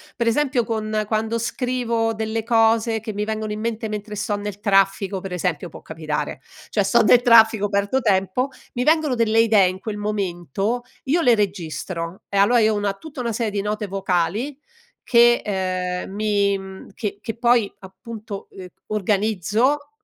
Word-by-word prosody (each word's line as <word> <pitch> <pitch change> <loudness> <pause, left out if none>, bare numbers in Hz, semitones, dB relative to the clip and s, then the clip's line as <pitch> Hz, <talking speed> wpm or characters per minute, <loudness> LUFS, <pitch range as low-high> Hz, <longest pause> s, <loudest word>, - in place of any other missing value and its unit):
Pre 235 - -1
esempio, 255 +1 +2
con 215 -1 -1
quando 220 +1 -1
scrivo 235 -1 -1
delle 220 0 -2
cose 225 0 +2
che 215 0 -6
mi 205 +1 -2
vengono 215 0 -3
in 210 - -4
mente 225 0 -3
mentre 210 0 -5
sto 205 0 -2
nel 205 -1 -6
traffico, 195 -1 +2
pre 185 -1 -6
esempio, 175 -1 -2
può - - -12
capitare, 155 -3 -4 0.3
cioè 205 - +1
sto 230 +4 +3
nel 245 +2 +6
traffico, 220 -3 +5
perdo 200 +6 +1
tempo, 200 +3 +1 0.3
mi 245 - -1
vengono 310 -2 +3
delle 225 -2 +2
idee 215 -4 +5
in 185 +1 -4
quel 210 -1 -5
momento, 205 - -2 0.2
io 325 +6 +2
le 245 -5 +5
registro; 185 -3 -3
e 200 - -2
allora 230 +5 +5
io 220 0 +3
ho - - -1
una 205 -1 -1
tutta 280 +6 -11
una 235 -2 -2
serie 225 -1 -1
di 200 -1 -1
note 210 +1 -2
vocali 195 - -1 0.5
che, 240 0 +5
ehm, 185 -2 -2
mi, 200 -1 +1
mhmm, 190 0 -10
che 205 -3 -4
che 225 +1 -5
poi 235 -3 +3
appunto, 205 +2 -9
ehm, 185 -1 -9 0.2
organizzo 215 - 0
215 Hz, 170 wpm, -22 LUFS, 195-230 Hz, 0.5 s, nel